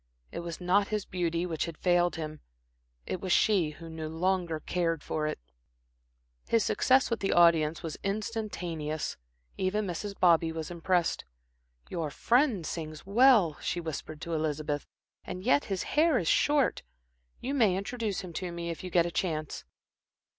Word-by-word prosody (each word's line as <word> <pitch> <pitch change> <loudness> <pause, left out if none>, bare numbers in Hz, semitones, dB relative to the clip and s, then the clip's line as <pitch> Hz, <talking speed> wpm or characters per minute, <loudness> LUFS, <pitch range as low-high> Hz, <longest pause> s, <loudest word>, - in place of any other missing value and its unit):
It - - -5
was 170 -1 -6
not 190 +3 +2
his 210 -2 -2
beauty 170 -1 -1
which 160 -3 -2
had 165 -2 -7
failed 175 -1 +2
him, 155 -2 -5 0.7
it 185 - -4
was 185 - -2
she 185 -5 +4
who 165 +2 -10
no 160 -1 -5
longer 170 0 0
cared 165 -1 -1
for 155 -1 -2
it. - - -2 1.1
His 230 -2 +2
success 260 -1 +3
with 230 - 0
the 195 - 0
audience 165 -2 +4
was 160 -3 -5
instantaneous. 195 -7 -3 0.4
Even 205 +3 0
Mrs. 200 +3 -5
Bobby 165 -2 +4
was 160 0 -5
impressed. 175 0 0 0.6
"Your 160 -3 -3
friend 235 - +2
sings 155 -1 -5
well," 210 - +5
she 175 - -2
whispered 155 -1 -6
to 170 - -4
Elizabeth, 150 -2 -2 0.4
"and 185 0 -6
yet 255 +5 +3
his 195 -2 -2
hair 310 -2 +3
is 175 - -1
short. 290 - +3 0.6
You 265 +3 -3
may 215 -9 +3
introduce 210 0 -3
him 180 -3 -9
to 180 +1 -4
me 170 0 -4
if 165 - -7
you 185 - -5
get 170 -1 +3
a 175 - -3
chance." 155 -4 -2
175 Hz, 160 wpm, -29 LUFS, 160-200 Hz, 1.1 s, well